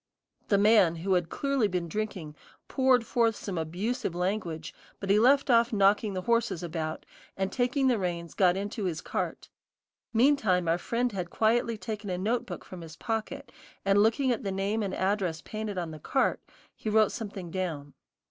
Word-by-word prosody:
The 200 - +3
man, 205 -5 +5
who 185 +4 -1
had 175 -3 +1
clearly 275 -5 0
been 180 -3 -2
drinking, 180 -5 -4 0.3
poured 260 -3 +3
forth 230 -1 +2
some 190 -5 -4
abusive 175 +5 -2
language, 180 -3 -2 0.3
but 195 -1 -1
he 205 - +5
left 270 +3 +4
off 235 0 +4
knocking 205 0 +3
the 185 - -3
horses 230 -6 +1
about, 160 -2 -4 0.3
and 190 0 -1
taking 260 +2 +1
the 245 -4 +2
reins, 170 -2 -3
got 185 -1 +3
into 205 +1 -3
his 165 -3 -2
cart; - - -4 0.6
meantime 220 - +3
our 165 +2 +2
friend 240 +5 -1
had 180 -4 -4
quietly 225 +2 +1
taken 210 0 -5
a 180 - -1
notebook 230 +6 -2
from 185 -2 -9
his 160 -2 -10
pocket, 225 - -4 0.3
and 195 +1 +4
looking 235 +5 +3
at 235 - -1
the 195 - -2
name 200 +3 -1
and 195 -2 -2
address 190 -4 0
painted 215 -2 -5
on 170 -3 -3
the 155 - -9
cart, 265 - 0 0.3
he 220 - -4
wrote 215 0 +4
something 200 -8 -6
down. 160 -7 -4
200 Hz, 175 wpm, -28 LUFS, 180-230 Hz, 0.6 s, man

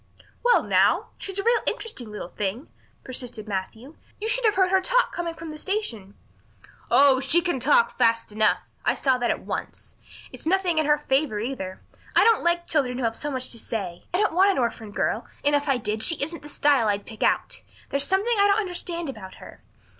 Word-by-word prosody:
"Well 485 0 +4
now, - - +2
she's 390 -1 -5
a 395 - -1
real 475 +2 +3
interesting 250 - -3
little 210 -4 -7
thing," 210 - -4 0.3
persisted 245 -4 -4
Matthew. 220 +8 -5 0.2
"You 430 - -3
should - - +1
have 430 - +3
heard 375 -1 +3
her 380 0 +4
talk - - +2
coming 340 -1 -4
from 325 -1 -8
the 305 - -7
station." 240 - -3 0.7
"Oh, 275 -2 +5
she 275 +6 +3
can 350 -6 -1
talk 250 -3 +3
fast 230 -2 +2
enough. 215 0 +2 0.3
I - - +2
saw 260 -2 +1
that 240 - 0
at - - -1
once. - - -6 0.4
It's - - -8
nothing 360 -2 +2
in 310 - +1
her 295 0 +4
favour, 270 -6 0
either. 210 -5 -5 0.3
I - - +6
don't 455 -1 +4
like 345 0 +1
children 265 -6 0
who 260 - -3
have 225 -1 0
so 295 - -4
much 260 -2 -2
to 230 - -1
say. 190 -7 -5
I 355 - 0
don't 420 -3 +1
want 380 +4 +5
an 390 - +1
orphan 230 -3 -2
girl 205 - -2 0.2
and 290 - +3
if 290 0 0
I 270 - +3
did 215 -1 -3
she 330 - +5
isn't 320 +4 -3
the 295 - -11
style 285 -6 +3
I'd 205 -1 -1
pick 220 -2 -11
out. - - 0 0.3
There's 280 0 +1
something 405 +5 +1
I 400 - +6
don't 400 0 +3
understand 350 -3 -3
about 210 -8 -8
her. - - -13
285 Hz, 215 wpm, -25 LUFS, 230-355 Hz, 0.7 s, I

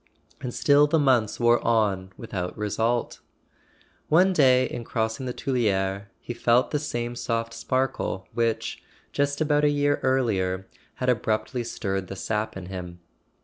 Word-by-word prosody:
And 125 - -4
still 145 +3 +4
the 160 - +2
months 130 -7 +2
wore 120 0 +4
on 100 -5 +1
with¬ 115 - -10
out 90 -2 -3
result. 110 +3 -1 0.9
One 185 +5 +5
day 130 -5 +5
in 120 - -5
crossing 115 +3 -2
the - - -1
Tuileries 100 -7 0
he 120 - -6
felt 120 +1 +2
the 150 - +1
same 120 -5 -3
soft 115 -1 -2
sparkle 130 -8 -2
which, 115 -1 -1 0.3
just 140 +1 0
about 150 -1 +2
a 150 - +5
year 145 0 +1
earlier, 95 -8 +1 0.3
had 125 - -1
ab¬ 120 -4 +1
ruptly 110 +3 0
stirred 95 -5 -3
the 95 - -6
sap 105 +1 -2
in 95 - -7
him. 90 -2 -7
120 Hz, 155 wpm, -25 LUFS, 105-130 Hz, 0.9 s, One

